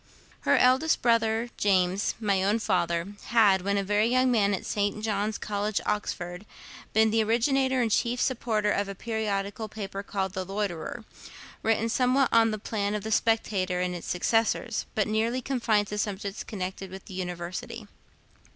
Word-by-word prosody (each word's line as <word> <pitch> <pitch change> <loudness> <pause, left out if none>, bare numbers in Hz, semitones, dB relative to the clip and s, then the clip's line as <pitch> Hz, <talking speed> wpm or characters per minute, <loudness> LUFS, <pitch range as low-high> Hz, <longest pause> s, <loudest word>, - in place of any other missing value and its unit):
Her - - +3
eldest 260 +5 +3
brother 230 0 +2
James, 190 -1 +2
my 200 -4 +1
own 205 +3 +2
father, 170 -3 0
had, 210 -5 +4
when 200 +2 0
a 200 - +1
very 205 +3 +2
young 255 +1 +3
man, 205 -4 +3
at - - -7
St. 205 +1 -1
John's 210 0 -1
College, 205 0 -2
Oxford, 180 -2 -3 0.4
been 220 0 +4
the 225 0 +3
originator 260 +3 +2
and 225 - -1
chief 240 +3 +1
supporter 225 -5 0
of 200 0 0
a 195 - -5
periodical 215 -1 -3
paper 200 -2 -5
called 195 -2 -3
'The 185 - -3
Loiterer,' 200 +3 -4 0.6
written 225 0 +1
somewhat 255 +3 +2
on 225 -1 +5
the 215 - -2
plan 205 -1 -2
of 210 - -3
the 220 - -4
'Spectator' 205 -5 +1
and 180 0 -1
its 175 - -7
successors, 225 +4 0
but 215 - +1
nearly 225 +3 0
confined 235 -5 +1
to 210 - -3
subjects 200 0 -3
connected 190 -1 -5
with 190 +1 -10
the - - -11
University. 180 +5 -5
210 Hz, 165 wpm, -27 LUFS, 195-225 Hz, 0.6 s, on